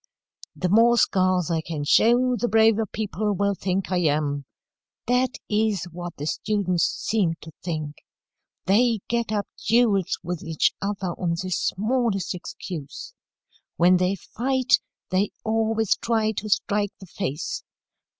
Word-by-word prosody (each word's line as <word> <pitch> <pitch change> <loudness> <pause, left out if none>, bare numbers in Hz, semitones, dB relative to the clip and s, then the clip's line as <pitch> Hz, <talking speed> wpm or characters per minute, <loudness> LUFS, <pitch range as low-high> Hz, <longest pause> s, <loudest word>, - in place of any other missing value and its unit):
"'The 180 - -1
more 230 +4 +5
scars 185 -5 +2
I 165 -1 +1
can 155 -2 -4
show, 245 +10 +4
the 240 +1 -1
braver 220 0 +4
people 210 0 -2
will 200 +1 +1
think 190 0 -2
I 180 - +2
am.' 145 -3 0 0.6
That 250 +2 +1
is 210 -4 +1
what 175 0 -7
the 145 - -5
students 180 -1 0
seem 190 -7 0
to 160 - -10
think. 155 -4 -4 0.7
They 225 +2 +3
get 235 -2 -1
up 205 -1 0 0.2
duels 220 -6 +3
with 175 -1 -4
each 165 -4 +1
other 200 -2 -2
on 170 -2 0
the 185 - -5
smallest 215 0 0
excuse. 175 -4 -7 0.6
When 180 +2 +5
they 185 +2 +1
fight, 255 +6 +1 0.3
they 190 +2 +2
always 220 -1 +1
try 220 -2 +1
to 215 0 -5
strike 205 -1 +1
the 190 - -10
face. 175 -4 -4
200 Hz, 140 wpm, -24 LUFS, 175-220 Hz, 0.7 s, more